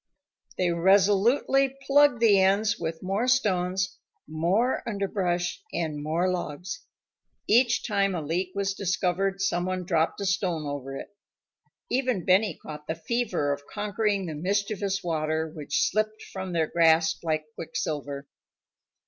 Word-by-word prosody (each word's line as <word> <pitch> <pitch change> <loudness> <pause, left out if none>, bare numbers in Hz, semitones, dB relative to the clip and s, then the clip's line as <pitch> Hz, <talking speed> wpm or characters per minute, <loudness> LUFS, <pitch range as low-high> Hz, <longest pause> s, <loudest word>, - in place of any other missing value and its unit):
They 180 -2 +1
resolutely 205 +9 +3
plugged 285 -4 +4
the 210 -4 +6
ends 200 +2 +2
with 165 0 -4
more 195 +6 0
stones, 190 -6 +1 0.3
more 175 - +1
underbrush, 190 - -1
and 155 -3 -3
more 160 +4 0
logs. 180 0 -4 0.7
Each 235 +2 +3
time 200 -3 +1
a 165 - -2
leak 175 +5 -1
was 195 -1 0
discovered, 190 0 -1
someone 185 -1 -1
dropped 160 -1 +1
a 200 - -2
stone 180 -5 0
over 135 -1 -5
it. 205 - -10 0.8
Even 250 -8 0
Benny 195 +3 +3
caught 150 -1 -9
the 160 - -2
fever 180 -6 -1
of 145 0 -9
conquering 205 -1 -1
the 160 - -4
mischievous 195 +3 -1
water 160 -1 -1
which 155 -2 -1
slipped 215 0 -1
from 190 -1 -5
their 165 -2 +1
grasp 160 0 +3
like 155 -2 -1
quicksilver. 145 -3 -4
185 Hz, 130 wpm, -27 LUFS, 160-205 Hz, 0.8 s, the